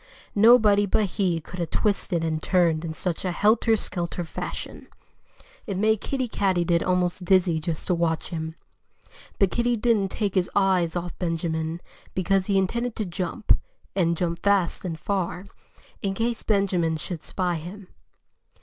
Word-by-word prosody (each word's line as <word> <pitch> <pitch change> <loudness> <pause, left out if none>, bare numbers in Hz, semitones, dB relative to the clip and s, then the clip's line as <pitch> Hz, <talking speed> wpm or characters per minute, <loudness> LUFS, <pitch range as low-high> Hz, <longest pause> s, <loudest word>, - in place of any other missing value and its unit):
Nobody 210 -2 +6
but 210 +2 +2
he 185 -3 0
could 180 +3 -9
have 170 -2 -2
twisted 195 -5 0
and 155 -1 -1
turned 170 -3 +2
in 165 - -3
such 165 +2 -3
a 185 - -1
helter 220 +4 +3
skelter 175 -3 -3
fashion. - - -6 0.8
It 200 -3 -2
made 220 +1 +2
Kiddie 260 -2 -2
Katydid 175 -5 +1
almost 180 0 0
dizzy 180 -3 +3
just 160 -1 -3
to - - +1
watch 165 -2 0
him. 160 -2 -4 0.8
But 195 -2 +3
Kiddie 240 0 +1
didn't 210 -4 +2
take 200 -1 -1
his 185 -2 +1
eyes 185 -4 +2
off 175 0 -4
Benjamin, 165 -1 -2 0.3
because 190 +1 +1
he 200 -2 +2
intended 235 +5 0
to 215 - -2
jump 185 +4 0 0.4
and 170 -3 +2
jump 170 -1 -2
fast 200 -4 +2
and 165 -4 -4
far 185 -1 -2 0.6
in 195 -1 -1
case 230 +2 -1
Benjamin 185 -6 +1
should 170 0 -6
spy 180 -1 -1
him. 180 +5 -9
185 Hz, 155 wpm, -25 LUFS, 170-200 Hz, 0.8 s, Nobody